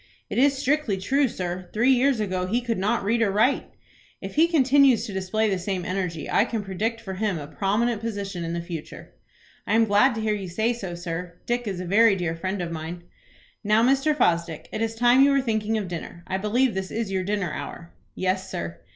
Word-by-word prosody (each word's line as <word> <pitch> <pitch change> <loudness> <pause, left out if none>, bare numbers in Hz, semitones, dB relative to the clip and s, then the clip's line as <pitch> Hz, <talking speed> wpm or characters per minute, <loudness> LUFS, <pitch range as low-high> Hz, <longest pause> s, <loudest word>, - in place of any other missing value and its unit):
"It - - 0
is 275 +1 +4
strictly 280 -6 0
true, 270 +9 +2
sir. 180 -4 -5
Three 235 +5 +3
years 260 -1 +3
ago 185 -3 -1
he 230 +6 +1
could 235 -4 -2
not 210 +4 0
read 230 +4 +1
or 220 - +3
write." 220 +8 +2 0.5
"If - - -7
he 320 +2 +4
continues 275 -5 +4
to 205 - -7
display 190 +4 0
the 195 -3 0
same 185 -1 -3
energy, 180 -4 -3
I - - +3
can 225 -2 -3
predict 215 +4 -2
for 200 -4 -7
him 200 -1 -1
a 145 - -6
prominent 210 +8 0
position 200 -5 -4
in 165 0 -3
the 170 0 -3
future." 170 -3 -8 0.5
"I 215 - +2
am 225 0 +5
glad 220 +5 +4
to 220 - -3
hear 215 -1 +1
you 195 -3 -4
say 220 +7 0
so, 190 -7 -6
sir. 170 0 -5
Dick 240 -1 -1
is 190 -3 -3
a 180 - -4
very 205 +3 +5
dear 175 -3 -2
friend 185 +2 -3
of 170 - -5
mine." 165 +2 -6 0.6
"Now, 215 +2 +3
Mr. 275 +4 +3
Fosdick, 170 - 0
it 215 - -4
is 225 0 -1
time 245 +3 +5
you 280 - +6
were 275 0 +3
thinking 220 -3 0
of 205 -3 -3
dinner. 170 0 -7
I 190 +1 -2
believe 230 +4 +1
this 190 0 -3
is 225 -3 -3
your 190 -1 0
dinner 200 -4 -2
hour?" 170 0 -7 0.2
"Yes, 185 0 -1
sir." 85 0 -5
205 Hz, 220 wpm, -25 LUFS, 180-235 Hz, 0.6 s, you